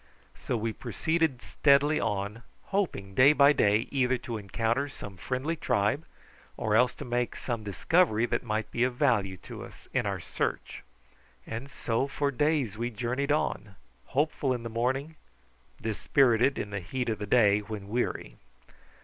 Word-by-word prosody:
So 125 - -3
we 110 0 -2
proceeded 160 -3 -1
steadily 145 +1 +3
on, 100 +3 -2 0.3
hoping 170 - -1
day 130 +8 +7
by 140 0 +6
day 105 -3 +2
either 130 -2 +2
to 115 -2 -5
encounter 115 +7 -1
some 100 -7 -9
friendly 130 - -2
tribe, 135 0 0 0.5
or 105 -1 0
else 125 +3 +4
to - - -7
make 120 0 -1
some 115 -3 -4
discovery 115 - +2
that 120 -1 -1
might 110 -2 -3
be 120 - +1
of 125 -1 0
value 100 -7 +1
to - - -8
us - - -13
in - - +1
our - - -2
search. - - -3 0.6
And 115 +5 -6
so 125 0 -1
for 140 0 -1
days 140 -6 0
we 120 +1 -1
journeyed 125 +5 -2
on, 145 -9 -1 0.3
hopeful 140 -1 0
in 120 - -6
the 115 - -4
morning, 130 +7 -1 0.6
dispirited 125 +3 +2
in 100 - -4
the 100 - -2
heat 120 +8 -3
of 110 -3 -1
the 105 - -4
day 105 -2 +5
when 105 -1 -7
weary. 100 - -2
120 Hz, 160 wpm, -29 LUFS, 105-140 Hz, 0.6 s, day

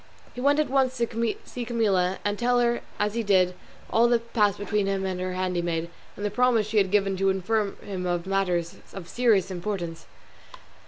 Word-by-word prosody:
He 250 - -6
went 285 +2 +4
at 305 - +2
once 260 -1 +2
to 230 -1 -1
see 245 - -6
Camilla, 200 -6 +1
and 205 0 -1
tell 245 0 +3
her, 240 0 +1 0.2
as 210 0 0
he 230 - 0
did, 185 -4 +3 0.4
all 235 +1 +5
that 240 -1 +3
had 235 - -22
passed 205 -4 +3
between 205 0 -1
him 195 -1 -1
and 185 -1 -2
her 185 0 -2
handmaid, 175 -2 -2 0.2
and 205 - -5
the 205 - -1
promise 245 -1 +3
she 215 +1 -2
had 195 -2 +4
given 195 0 +2
him - - -4
to 195 +1 +2
inform 200 +2 0
him 180 -3 -2
matters 180 -3 0 0.2
of 185 -4 -8
serious 210 -6 +2
importance. 175 -3 -4
200 Hz, 200 wpm, -26 LUFS, 185-230 Hz, 0.4 s, all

